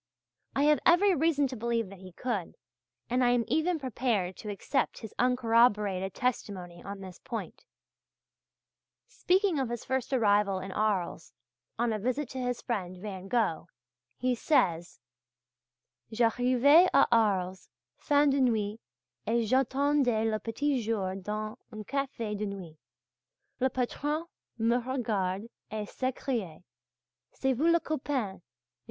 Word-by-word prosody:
I 275 - +2
have 300 0 +5
every 370 +3 +5
reason 310 -2 +2
to 255 - -5
believe 230 -2 -1
that 195 - -11
he 185 0 -11
could, 205 -2 -3 0.5
and 250 +1 +1
I 245 - +4
am 245 -1 +3
even 320 +7 +1
prepared 235 - -1
to 215 - -7
accept 205 +7 -1
his 220 -3 -8
uncorroborated 225 -6 +2
testimony 190 -8 -3
on 200 0 -7
this 185 -2 -10
point. - - -7 1.4
Speaking 370 -3 +1
of 260 -3 -1
his 240 -1 -5
first 260 -1 -2
arrival 205 -5 +3
in 190 +1 -6
Arles, 195 -5 -1 0.5
on 235 -1 +1
a 215 - -2
visit 255 +5 -1
to 260 - -6
his 245 -1 -2
friend 185 -6 -3
Van 190 -1 -7
Gogh, 210 -7 0 0.5
he 255 0 +1
says: 180 - +1 1.1
"J'arrivai 250 +8 +5
à 275 - +7
Arles 190 -5 +1 0.3
fin 290 0 +3
de 275 0 +2
nuit 220 -3 +1 0.5
et 230 +1 +2
j'attendais 265 -1 +2
le 215 - -1
petit 265 +4 -1
jour 210 -4 -1
dans 215 +4 -5
un 215 -1 -7
café 255 -3 -3
de 210 +1 -2
nuit. 180 -6 -8 0.8
Le 260 +1 +2
patron 290 +5 -2 0.3
me 230 +1 +2
regarde 215 -7 -1 0.3
et 215 -1 -4
s'écria: 240 - -3 0.7
'C'est 265 0 0
vous 285 +7 +1
le 340 - +4
copain! 260 - -3
230 Hz, 135 wpm, -29 LUFS, 200-265 Hz, 1.4 s, à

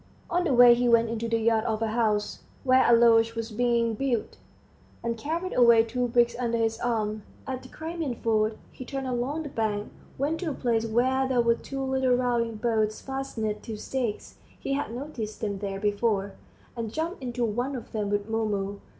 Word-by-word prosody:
On 350 +1 +2
the 295 - +2
way 245 0 +9
he 245 0 +1
went 230 -1 +4
into 230 0 -3
the 230 - +2
yard 225 -1 +2
of 220 -1 -1
a 225 - 0
house, 215 -2 0 0.2
where 260 -1 +5
a - - +6
lodge 230 -1 +5
was 230 0 -4
being 235 0 +1
built, 240 0 -2 0.7
and 235 0 -1
carried 330 +9 -3
away 235 -2 +6
two 245 +2 -1
bricks 240 0 +3
under 235 -2 0
his 225 0 0
arm. 215 -3 -1 0.2
At 260 -2 -4
the - - -13
Crimean 320 -5 -4
Ford, 215 -1 0
he - - -9
turned 270 +1 -5
along 260 +5 -2
the 290 - -6
bank, 215 -4 -2 0.3
went 295 +4 -1
to 355 - -2
a - - -2
place 230 -2 0
where 260 +4 +2
there 255 -2 +2
were 235 0 +4
two 270 +3 -5
little 265 -1 +2
rowing 240 -2 0
boats 215 -1 0
fastened 240 -6 -4
to 220 -2 -6
stakes 240 -1 -4 0.2
(he 275 - -2
had 280 -4 -2
noticed 240 -4 -6
them 200 -3 -3
there 195 -1 -4
before), 205 -1 0 0.4
and 230 -2 -4
jumped 320 - -3
into 245 -1 -2
one 245 +5 -2
of 245 - -8
them 210 -2 -2
with 205 0 -1
Mumu. 205 -3 -2
235 Hz, 195 wpm, -27 LUFS, 220-260 Hz, 0.7 s, way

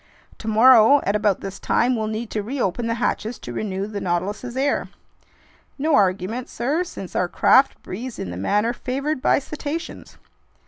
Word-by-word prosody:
"Tomorrow 230 +4 +6
at 200 - 0
about 205 -2 +1
this 195 0 -7
time, 250 +1 +1
we'll 220 -1 -2
need 220 +1 -4
to 215 - -1
reopen 235 -1 -2
the 230 - 0
hatches 230 -1 -2
to 120 - -8
renew 195 - -3
the 205 -1 -5
Nautilus's 205 +8 -3
air." 280 +2 0 0.9
"No 305 +3 0
argument, 200 +3 +1
sir, 295 +8 -1
since 195 - -9
our 180 - +1
craft 265 +9 +4
breathes 240 +6 -6
in 90 - -5
the - - -6
manner 210 - 0
favored 275 +4 -3
by - - +3
cetaceans." 305 +3 -6
225 Hz, 165 wpm, -22 LUFS, 200-260 Hz, 0.9 s, Tomorrow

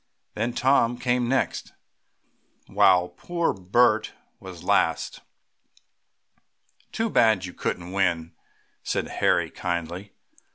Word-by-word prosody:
Then 115 +3 -2
Tom 125 -2 +2
came 125 -1 0
next, 135 - -1 0.9
while 90 -1 +4
poor 170 - -2
Bert 110 +3 +2 0.3
was 90 -3 -10
last. - - 0 1.7
"Too 225 - -1
bad 110 - +3
you 90 - -8
couldn't 90 0 -4
win," 85 -4 0 0.5
said - - -2
Harry - - +1
kindly. 85 +3 -4
100 Hz, 95 wpm, -25 LUFS, 90-125 Hz, 1.7 s, while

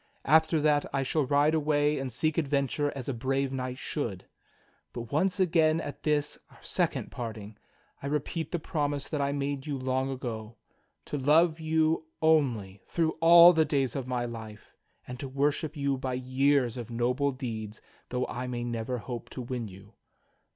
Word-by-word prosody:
After 160 +2 +4
that 150 -1 +3
I 135 -1 0
shall 140 +1 0
ride 145 +2 +3
away 150 -1 +2
and 135 -1 -4
seek 155 +6 0
adventure 145 -1 0
as 130 -3 -6
a 140 - -1
brave 135 +3 -1
knight 130 -1 -4
should. 115 - -4 0.7
But 120 -1 -7
once 185 +6 +1
again 165 -3 +3
at 145 - -6
this, 150 -1 0
our - - -19
second - - -2
parting, 110 -3 -6 0.5
I 140 - -4
repeat 150 +2 -2
the 175 - 0
promise 145 -3 -2
that 150 -3 -2
I 140 0 +1
made 140 0 -3
you 145 -2 -2
long 130 +1 -1
ago 115 -4 -5 0.3
— - - -46
to 145 - -3
love 160 +4 +4
you 160 0 +1
only 125 -12 +2
through 165 -2 +1
all 170 +1 +9
the 160 -1 +4
days 140 -5 0
of 135 -3 -3
my 125 -1 -1
life, 110 -2 -9 0.3
and 125 0 -7
to 135 - -5
worship 145 +3 0
you 140 -1 0
by 130 -1 -2
years 130 -1 +1
of 120 -2 -6
noble 125 +4 0
deeds 110 -5 -6 0.3
though 125 0 -1
I 125 +1 -5
may 120 -1 -3
never 120 +1 -3
hope 120 +1 -6
to 130 - -6
win 120 -2 -4
you. 100 +2 -14
135 Hz, 180 wpm, -29 LUFS, 125-150 Hz, 0.7 s, all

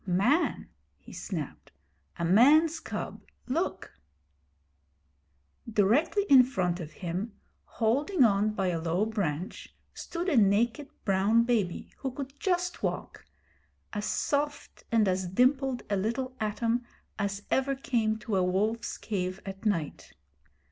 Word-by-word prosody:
'Man!' 200 - +1 0.3
he - - -14
snapped. 140 - -6 0.5
'A 170 - -1
man's 295 - +5
cub. - - -6 0.3
Look!' 260 - -2 1.8
Directly 250 - +3
in 270 -6 +9
front 185 -8 -1
of 160 -2 -7
him, 185 +6 -4 0.3
holding 275 - +1
on 210 -1 +3
by 190 -3 0
a 165 -2 -2
low 170 +5 +1
branch, 190 -6 -3 0.2
stood 345 +1 -5
a 335 - +2
naked 230 +6 +3 0.2
brown 200 +4 +3
baby 220 -7 -1
who 270 - -3
could 270 +1 -7
just 360 -1 -1
walk - - -4 0.7
as 210 -1 -2
soft 290 0 -2
and 225 -3 +4
as 185 0 0
dimpled 255 +5 +2
a 205 - 0
little 235 +6 -2
atom 230 +3 0 0.4
as 200 0 -2
ever 270 +1 +2
came 230 -5 0
to 215 -2 -2
a 185 - +3
wolf's 210 +5 0
cave 185 -3 -3
at 195 +2 -4
night. 165 -8 -2
220 Hz, 125 wpm, -29 LUFS, 190-265 Hz, 1.8 s, in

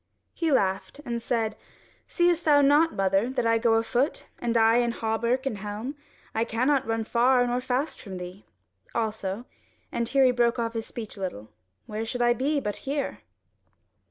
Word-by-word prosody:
He 330 -2 0
laughed 190 -1 0
and 235 -1 -3
said: 225 -2 -1 0.5
"Seest 345 -1 +2
thou 290 -2 +5
not, 295 +4 +4
mother, 195 +4 +2
that 255 -2 -1
I 230 0 +3
go 225 -1 +3
afoot, 240 +6 0
and 235 -1 0
I 225 +1 +5
in 240 -1 +2
hauberk 235 +4 -1
and 225 -7 -2
helm? 210 +7 -5 0.4
I 225 - +1
cannot 255 +4 +1
run 225 0 0
far 245 +2 +3
or 245 +1 0
fast 260 +4 -2
from 190 -3 -7
thee. 180 +2 -8 0.5
Also" 220 -1 -2 0.5
(and 235 -1 -1
here 275 -1 +4
he 255 - +5
broke 240 -1 +2
off 230 -1 -1
his 225 -1 -4
speech 220 -3 -7
a - - -9
little) 110 - -5 0.4
"where 215 +1 -4
should 240 +2 -2
I 240 0 +5
be 285 +5 0
but 210 -6 -3
here?" 280 +1 -3
235 Hz, 180 wpm, -26 LUFS, 220-260 Hz, 0.5 s, thou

